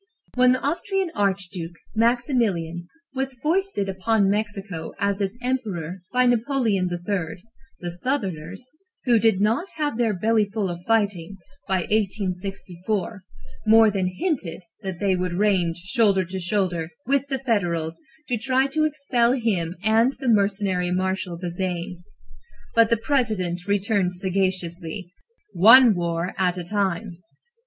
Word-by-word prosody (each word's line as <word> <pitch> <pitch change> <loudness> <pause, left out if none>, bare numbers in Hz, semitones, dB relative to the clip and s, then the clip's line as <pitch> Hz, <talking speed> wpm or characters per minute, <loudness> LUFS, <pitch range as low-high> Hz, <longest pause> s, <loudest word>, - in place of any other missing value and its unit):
When 250 0 +5
the 255 - -1
Austrian 360 +5 -1
archduke, 185 -4 -2 0.2
Maximilian, 225 - 0 0.3
was 270 0 -3
foisted 335 - 0
upon 195 +1 +1
Mexico 200 -5 -3
as 200 -1 0
its 200 +3 -2
emperor 195 -9 -3
by 250 0 +3
Napoleon 235 -6 +1
III., 175 -1 -3 0.4
the 175 -1 -4
Southerners, 195 - -3 0.4
who 240 -3 +4
did 220 -3 +3
not 220 - +1
have 295 -6 -2
their 225 -4 +2
"bellyful 210 -1 +1
of 175 0 -7
fighting" 200 -5 0 0.3
by 190 -1 +1
1864, 195 0 -2 0.5
more 220 0 +7
than 190 -2 0
hinted 190 - -3 0.2
that 190 -4 -5
they 195 -2 +2
would 180 -1 -2
range 180 -3 +1
shoulder 195 0 +2
to 190 +2 -5
shoulder 180 -3 -1 0.2
with 275 +2 +1
the 270 -1 -1
Federals 175 - -1 0.3
to 245 -3 -1
try 260 +2 +2
to 310 +3 +1
expel 270 -6 +1
him 195 -9 -1
and 225 +4 +4
the 270 - -4
mercenary 195 -4 +1
Marshal 185 -1 -1
Bazaine. 175 0 -4 0.7
But 230 -2 +5
the 230 - +3
President 215 -9 -1
returned 200 -2 +1
sagaciously: 180 -1 -2 0.4
"One 225 +6 +8
war 170 0 -2
at 180 -1 +1
a 180 - -3
time!" 190 -1 -2
200 Hz, 130 wpm, -24 LUFS, 180-230 Hz, 0.7 s, One